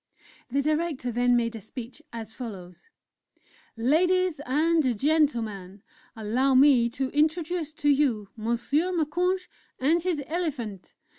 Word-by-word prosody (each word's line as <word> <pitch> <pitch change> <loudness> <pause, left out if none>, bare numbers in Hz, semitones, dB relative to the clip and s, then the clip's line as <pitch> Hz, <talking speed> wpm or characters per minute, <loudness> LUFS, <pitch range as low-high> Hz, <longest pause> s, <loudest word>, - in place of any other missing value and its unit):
The 275 +3 0
Director 305 -4 -1
then 245 +1 +2
made 230 -1 -1
a 220 - -7
speech, 240 +6 -9
as 225 -2 -7
follows: 190 - -9 0.9
"Ladies 345 +6 +2
and 300 -3 +2
Gentlemen, 225 - 0 0.3
allow 245 +5 +1
me 255 -3 +6
to 265 +2 -3
introduce 315 +1 0
to 300 -2 0
you 260 -8 +2
Monsieur 240 +10 0
Moukounj 360 +3 0 0.3
and 315 +6 +2
his 350 -3 -1
Elephant. 275 - -4
275 Hz, 120 wpm, -26 LUFS, 230-320 Hz, 0.9 s, me